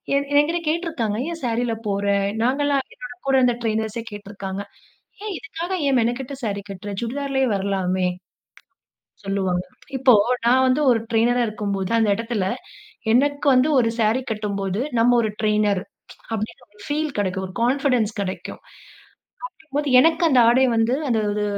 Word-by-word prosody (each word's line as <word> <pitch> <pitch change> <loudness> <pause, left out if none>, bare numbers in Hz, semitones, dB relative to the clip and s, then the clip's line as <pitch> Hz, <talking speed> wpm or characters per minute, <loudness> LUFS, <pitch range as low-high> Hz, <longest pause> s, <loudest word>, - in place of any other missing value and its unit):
என் 280 0 0
என்கிட்ட 325 +4 +1
கேட்டுருக்காங்க. 315 - -1
ஏன் 330 - -6
சாரீல 235 0 0
போற? 200 0 -1 0.4
நாங்கலாம் 275 +2 +1
என் - - -39 0.3
கூட 270 - +3
இருந்த 250 -1 +3
ட்ரெய்னர்ஸே 220 0 -1
கேட்ருக்காங்க. 200 -1 -6 0.6
ஏன் 425 -1 -4
இதுக்காக 330 +3 -6 0.2
ஏன் 270 - +3
மெனக்கட்டு 245 +4 -2
சேரி 200 -2 -2
கட்டுற? 195 +1 -7
சுடிதார்லேயே 265 +2 -1
வரலாமே 190 -2 0 1.2
சொல்லுவாங்க. 190 -2 -1 0.3
இப்போ 260 -1 +5 0.3
நான் 255 +2 +5
வந்து 260 +4 +2
ஒரு 230 - +3
ட்ரெய்னரா 240 +2 +3
இருக்கும் 210 -2 -3
போது, 190 -1 -3
அந்த 220 -2 +2
இடத்துல 230 -4 -2 0.7
எனக்கு 285 +3 +2
வந்து 255 +3 +4
ஒரு 230 -1 +2
சாரி 225 +4 +2
கட்டும்போது, 200 -1 -2 0.2
நம்ம 245 +1 +5
ஒரு 220 - 0
டிரெய்னர் 210 -3 +2 0.5
அப்டீங்குற 225 +4 -5 0.2
பீல் 300 0 -2
கிடைக்கும். 190 -1 -1
ஒரு 185 - -10
கான்ஃபிடன்ஸ் 250 -4 +2
கிடைக்கும். 190 -1 -5
அப்டீங்கும் - - -20 0.8
போது 295 -1 -1
எனக்கு 325 +5 +3
அந்த 265 -5 +4
ஆடை 255 +3 +5
வந்து 225 +2 +2
அந்த 230 -3 +2
ஒரு 210 0 -1
230 Hz, 145 wpm, -22 LUFS, 205-265 Hz, 1.2 s, இப்போ